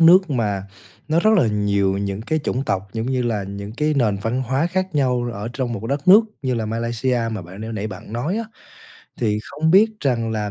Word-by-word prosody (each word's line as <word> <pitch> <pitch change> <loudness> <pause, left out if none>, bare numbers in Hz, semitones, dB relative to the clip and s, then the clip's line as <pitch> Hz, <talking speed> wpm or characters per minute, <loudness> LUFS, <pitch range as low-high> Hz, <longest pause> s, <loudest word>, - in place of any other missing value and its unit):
nước 175 +1 +7
mà 105 -6 0 0.5
nó 165 +2 +3
rất 215 - +4
là 135 - +4
nhiều 100 -2 +1
những 100 0 -3
cái 155 +7 0
chủng 135 -2 -2
tộc, 95 +1 -1
giống 115 +1 -3
như 130 -1 0
là, 110 -4 -1
những 100 +1 -7
cái 150 0 +1
nền 110 -6 +2
văn 120 +4 0
hóa 135 +6 0
khác 185 0 -2
nhau 125 -4 +1
ở 105 +1 -5
trong 125 -1 -2
một 105 - -4
cái 115 - -5
đất 140 +5 -2
nước 205 +4 +10 0.2
như 130 -1 0
là 115 -2 -2
Malaysia 115 +2 -1
mà 105 -5 -4
bạn 95 +4 -11
n 110 +1 -5
nãy 105 +1 -3
bạn 105 +2 -9
nói 150 - -1
á. 230 - -2 0.8
Thì 105 -3 +1
không 160 +6 -1
biết 210 +5 +6
rằng 115 -5 0
là 105 -2 -2
120 Hz, 235 wpm, -21 LUFS, 105-145 Hz, 0.8 s, nước